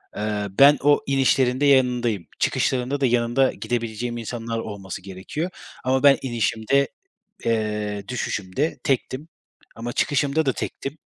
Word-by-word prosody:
Eee, 105 -1 -2
ben 140 +8 +7
o 145 +1 +5
inişlerinde 135 0 +2
yanındayım. 125 - +3
Çıkışlarında 130 +2 0
da - - +4
yanında 120 +2 +2
gidebileceğim 120 +1 -3
insanlar 115 0 -4
olması 100 -4 -6
gerekiyor 95 - -5 0.3
ama 130 +1 +1
ben 140 -1 +7
inişimde, 120 +2 +1 0.6
eee, 105 -2 -1
düşüşümde 125 - -2
tektim 135 +2 -1 0.5
ama 120 +1 -5
çıkışımda 145 +2 +1
da 135 - +2
tektim. 135 +3 -5
120 Hz, 120 wpm, -23 LUFS, 110-135 Hz, 0.6 s, ben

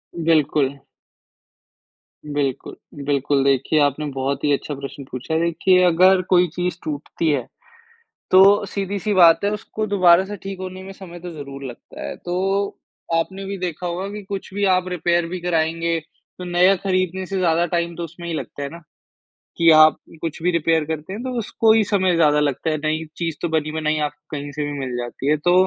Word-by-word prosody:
बिल्कुल। 150 -4 +1 1.5
बिल्कुल, 145 -3 -3 0.3
बिल्कुल। 140 -1 +1
देखिए, 140 +3 +2
आपने 145 +1 +1
बहुत 135 +1 -2
ही 145 - +2
अच्छा 145 +1 -2
प्रश्न 140 0 -8
पूछा 130 +5 -5
है 170 - +1
कि 185 -1 +5
अगर 185 +2 +5
कोई 180 -1 +5
चीज़ 180 -1 -2
टूटती 155 +2 -3
है, 140 -5 0 0.9
तो 195 +2 +6
सीधी-सी 200 +1 -3
बात 170 -1 +6
है 200 - +2
उसको 215 0 -4
दोबारा 185 -3 +5
से 205 +2 -6
ठीक 195 -1 -6
होने 185 0 -6
में 195 +1 -9
समय 175 -3 -11
तो 175 +1 -7
ज़रूर 140 -3 -8
लगता 120 -3 -10
है। - - -5
तो 195 +3 -1 0.4
आपने 190 +4 -1
भी 195 +1 -4
देखा 180 -1 -4
होगा 180 +3 -3
कि 210 0 -6
कुछ 195 -2 -5
भी 205 0 0
आप 185 0 0
रिपेयर 175 -1 0
भी 180 +2 -5
कराएँगे 165 -1 0
तो 165 +3 -15
नया 180 +2 +4
ख़रीदने 185 0 -1
से 195 - -4
ज़्यादा 170 -2 +2
टाइम 170 0 0
तो 170 - -4
उसमें 170 +1 -9
ही 165 - -3
लगता 145 - -6
है 140 - -3
ना, 170 - -10 0.8
कि 165 0 +5
आप 155 0 +7 0.2
कुछ 165 -1 -4
भी 180 - +3
रिपेयर 165 -1 +2
करते 160 +3 -5
हैं 215 - -5
तो 260 - -3
उसको 225 0 +2
ही 220 -1 +4
समय 190 -3 +1
ज़्यादा 150 -3 +4
लगता 150 +1 0
है 155 - 0
नहीं 155 +1 -2
चीज़ 165 -2 -2
तो 170 - -1
बनी-बनाई 155 0 -1
आपको 150 0 -9
कहीं 145 0 -6
से 150 +1 -3
भी 145 - -3
मिल 130 -2 -4
जाती 120 +2 -5
है। 155 - +3
तो 175 +4 +2
170 Hz, 190 wpm, -21 LUFS, 150-185 Hz, 1.5 s, आप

